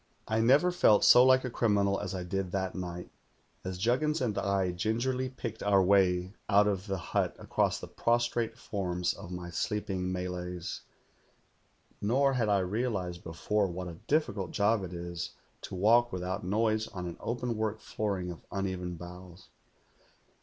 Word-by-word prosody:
"I 110 +1 +1
never 140 +10 +5
felt 110 -12 +4
so 125 - +8
like 130 0 +5
a - - -2
criminal 100 -4 +2
as 95 - -4
I 90 - -3
did 95 +1 -2
that 95 -1 -1
night, 90 -1 -6 0.5
as 95 -1 -4
Juggins 130 - +1
and 115 -7 -1
I 100 -2 +1
gingerly 120 +8 -1
picked 115 -3 -6
our 100 -2 +4
way 95 -1 +3 0.2
out 105 0 +5
of 100 -1 -1
the 95 -1 -1
hut - - -1
across - - 0
the - - -8
prostrate 120 -1 0
forms 90 -3 -2
of - - -10
my 90 -1 -6
sleeping 95 0 -2
Malays; 90 -1 -4 1.2
nor 135 +6 +3
had 120 -4 +1
I 100 -2 +3
realized 95 -3 -2
before 100 +5 0
what 90 0 -5
a 85 - -10
difficult 140 - 0
job 105 0 +2
it 90 - -6
is 85 0 -5 0.3
to - - -7
walk 115 +5 +4
without 90 +1 -3
noise 110 +3 +1
on 90 -1 -6
an 85 -1 -6
openwork 110 -2 -2
flooring 100 -5 -3
of 85 - -10
un 100 0 -1
even 90 -2 -3
boughs. 90 +1 -11
100 Hz, 160 wpm, -30 LUFS, 90-115 Hz, 1.2 s, so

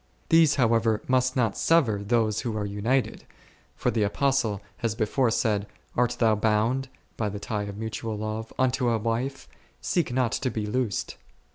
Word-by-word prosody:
These 165 -3 +5
however 115 -3 +2
must 130 0 +2
not 115 -6 +1
sever 125 -12 +2
those 110 0 +1
who 115 -3 -3
are 105 - -2
united, 110 +6 -1 0.5
for - - 0
the 110 - 0
Apostle 110 -1 +1 0.2
has 115 -3 -2
before 115 +3 +1
said, 105 -3 0 0.3
art 120 0 +2
thou 110 -2 +3
bGund 110 +5 +1 0.3
by 105 -2 -1
the 105 - -5
tie 105 0 -3
of 100 0 -7
mutual 110 0 -4
love 110 +1 -4
unto 130 -1 +2
a 115 - +2
wife, 120 +5 -2 0.3
seek 170 -8 0
not 125 -2 +1
to 130 - -1
be 110 -2 -3
loosed. 110 -1 -2
115 Hz, 165 wpm, -26 LUFS, 105-130 Hz, 0.5 s, These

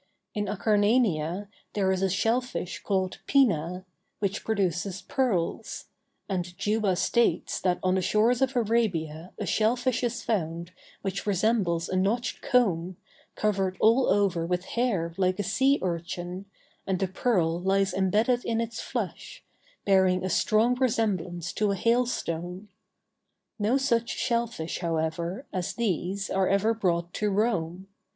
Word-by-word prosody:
In 210 -1 -1
Acarnania 205 -4 +1 0.3
there 195 -2 +1
is 190 0 0
a 195 - +2
shell 225 +6 +2
fish 245 -8 -5
called 190 -2 -1
"pina," 185 - +2 0.3
which 200 -1 -2
produces 195 -2 -1
pearls; 220 -11 -1 0.4
and 180 -2 -3
Juba 205 -1 +1
states 235 +6 +1
that 180 -1 +2
on 185 0 +2
the 190 - +1
shores 220 +7 +2
of 265 0 +1
Arabia 185 -8 0
a - - -3
shell 220 +2 +2
fish 250 0 -1
is 235 -1 -2
found 170 -5 -2 0.3
which 195 +1 -3
resembles 195 -4 +1
a - - -3
notched 205 +6 0
comb, 185 -8 +1 0.4
covered 195 -3 0
all 230 +4 +4
over 195 -4 +2
with 180 +2 -1
hair 195 -9 0
like 185 -1 +1
a 205 - -1
sea 265 +9 +3
urchin, 175 +1 -4 0.4
and 190 -1 +1
the 190 +1 0
pearl 180 -5 +1
lies 195 0 +2
imbedded 215 +6 +2
in 225 -1 -1
its 230 -1 -3
flesh, - - -5 0.4
bearing 185 -2 +3
a 185 - -1
strong 225 +3 +3
resemblance 185 -9 0
to 210 -1 +1
a 200 - +1
hailstone. 195 -5 -1 0.9
No 215 +6 +2
such 235 -4 +1
shell 235 -1 0
fish, 165 -8 -5
however, 170 - -2
as 185 -2 -2
these 195 -3 -1
are 190 -1 +2
ever 200 +3 +3
brought 175 -5 -1
to 210 - 0
Rome. 190 -4 -1
195 Hz, 145 wpm, -27 LUFS, 180-225 Hz, 0.9 s, all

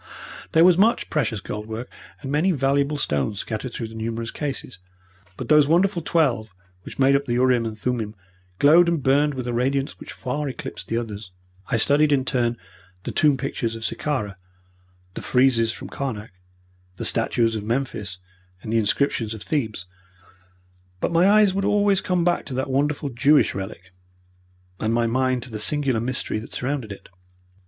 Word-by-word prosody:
There 165 +1 +6
was 180 -1 +5
much 225 +4 +2
precious 115 -9 0
gold 105 +2 -6
work 110 +2 -5 0.4
and 135 - -4
many 155 +6 +2
valuable 140 0 +1
stones 75 - -1
scattered 110 +3 -5
through 115 -1 -5
the - - -12
numerous 115 +1 -4
cases, 135 -7 -5 0.6
but - - -6
those 150 -2 +5
wonderful 175 +3 +2
twelve 125 - 0 0.3
which - - -10
made 135 0 +4
up 140 0 +1
the 120 - -2
urim 125 -1 +2
and 110 -1 -6
thummim 110 -2 -2 0.4
glowed 165 - +6
and 165 -5 -1
burned 145 +2 +3
with 130 -2 -4
a 120 - -2
radiance 135 +3 -1
which - - -9
far 140 +3 -3
eclipsed 130 - -7
the 115 - -1
others. 105 -4 -5 0.4
I - - +1
studied 145 +6 +3
in 135 -2 +2
turn 120 -2 0 0.5
the - - -4
tomb 150 -3 +3
pictures 120 -3 -3
of 115 0 -5
Sicara, 110 -10 -2 0.8
the - - -6
friezes 125 -3 +3
from - - -8
Karnak, 115 -7 -5 0.7
the - - -4
statues 115 -1 +2
of 110 -2 -3
Memphis, 110 -5 -3 0.5
and 110 - -4
the 115 - +4
inscriptions 115 0 0
of 105 - -9
Thebes, 110 -11 -2 1.1
but - - -1
my 170 +3 +4
eyes 210 -2 +5
would 195 +1 -1
always 205 -1 +3
come 180 -2 0
back 175 -1 +1
to 130 - -5
that 130 +1 -2
wonderful 145 +1 0
Jewish 140 +5 +3
relic, 95 -1 -7 0.9
and 110 +1 0
my 120 0 +2
mind 130 +1 0
to 125 - -9
the 110 - -5
singular 135 0 +1
mystery 125 -2 -2
which 110 - -10
surrounded 130 -4 -3
it. 100 - -10
130 Hz, 175 wpm, -23 LUFS, 115-145 Hz, 1.1 s, There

